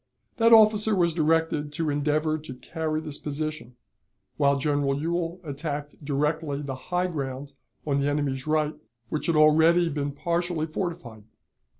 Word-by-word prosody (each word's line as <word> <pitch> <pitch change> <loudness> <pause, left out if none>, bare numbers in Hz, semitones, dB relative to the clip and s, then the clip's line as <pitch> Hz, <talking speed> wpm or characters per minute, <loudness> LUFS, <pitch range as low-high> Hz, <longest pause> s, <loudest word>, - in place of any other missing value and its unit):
That 230 0 +4
officer 215 -1 +6
was 170 -3 +2
directed 160 -2 +1
to 160 -1 -1
endeavor 155 +2 0
to 150 -4 -9
carry 155 +3 -3
this 150 -2 -7
position, 150 -4 -5 0.6
while 140 -1 +3
General 140 -1 0
Ewell 170 +2 -2
attacked 145 0 -5
directly 150 +1 -1
the 140 -2 -4 0.2
high 180 0 +1
ground 140 -4 -5 0.3
on 140 -2 +1
the 140 - +1
enemy's 145 -2 -2
right, 155 0 +1 0.4
which 155 - -3
had 170 - +2
already 160 +3 +5
been 145 -1 -2
partially 170 +2 -1
fortified. 155 - -5
155 Hz, 140 wpm, -26 LUFS, 145-165 Hz, 0.6 s, officer